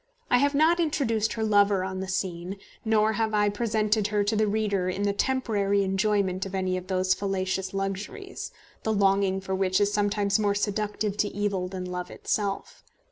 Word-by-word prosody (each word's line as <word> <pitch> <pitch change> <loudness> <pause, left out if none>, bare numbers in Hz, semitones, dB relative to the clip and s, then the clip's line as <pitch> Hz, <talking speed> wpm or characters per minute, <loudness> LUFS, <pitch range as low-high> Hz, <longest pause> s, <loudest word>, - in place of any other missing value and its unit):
I 245 - +6
have 285 +1 +2
not 320 +4 +4
introduced 240 -9 +1
her 225 - -2
lover 205 -3 +3
on 190 0 -4
the 190 - -4
scene, 185 0 -3 0.3
nor 220 -1 +3
have 220 -1 0
I 205 0 +3
presented 215 -1 +1
her 210 0 +1
to 210 +2 0
the 215 0 +2
reader 205 -3 0
in 190 +2 -2
the 200 0 +1
temporary 205 -5 +1
enjoyment 195 -1 +1
of 195 - -6
any 185 -1 0
of 185 0 -5
those 185 0 +2
fallacious 190 -1 -2
luxuries, 205 - -4 0.3
the 220 - 0
longing 195 -1 +2
for 190 0 -4
which 190 -1 +1
is 205 0 +2
sometimes 205 0 +1
more 205 -1 +1
seductive 205 0 -1
to 210 - +2
evil 200 -3 -1
than 185 0 -5
love 180 0 -5
itself. 210 - -3
205 Hz, 185 wpm, -27 LUFS, 190-215 Hz, 0.3 s, I